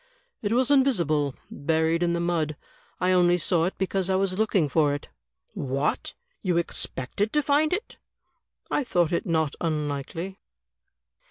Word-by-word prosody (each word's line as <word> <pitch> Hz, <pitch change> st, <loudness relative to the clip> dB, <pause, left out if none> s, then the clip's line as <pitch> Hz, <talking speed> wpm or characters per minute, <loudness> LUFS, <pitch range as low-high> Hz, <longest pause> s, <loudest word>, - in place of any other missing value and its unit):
"It 205 Hz, -, -1 dB
was 255 Hz, +3 st, +3 dB
invisible, 170 Hz, -, +3 dB, 0.2 s
buried 160 Hz, +2 st, +1 dB
in 170 Hz, -1 st, +2 dB
the 170 Hz, -, 0 dB
mud. 165 Hz, -3 st, -1 dB, 0.4 s
I 180 Hz, 0 st, +2 dB
only 175 Hz, -1 st, +4 dB
saw 170 Hz, -1 st, +2 dB
it 185 Hz, -, -3 dB
because 190 Hz, -1 st, -1 dB
I 190 Hz, -, +2 dB
was 190 Hz, -1 st, +1 dB
looking 200 Hz, -6 st, +2 dB
for 145 Hz, +1 st, +2 dB
it." 145 Hz, -, -8 dB, 0.4 s
"What! 135 Hz, +2 st, -2 dB, 0.3 s
you 180 Hz, -4 st, +1 dB
expected 170 Hz, -, -2 dB
to 300 Hz, -, +2 dB
find 295 Hz, +2 st, +3 dB
it?" 410 Hz, +6 st, -3 dB, 0.7 s
"I 295 Hz, -, +1 dB
thought 175 Hz, -9 st, +1 dB
it 170 Hz, -, -1 dB
not 160 Hz, -3 st, +1 dB
imlikely." 155 Hz, +3 st, -3 dB
175 Hz, 150 wpm, -26 LUFS, 155-195 Hz, 0.7 s, only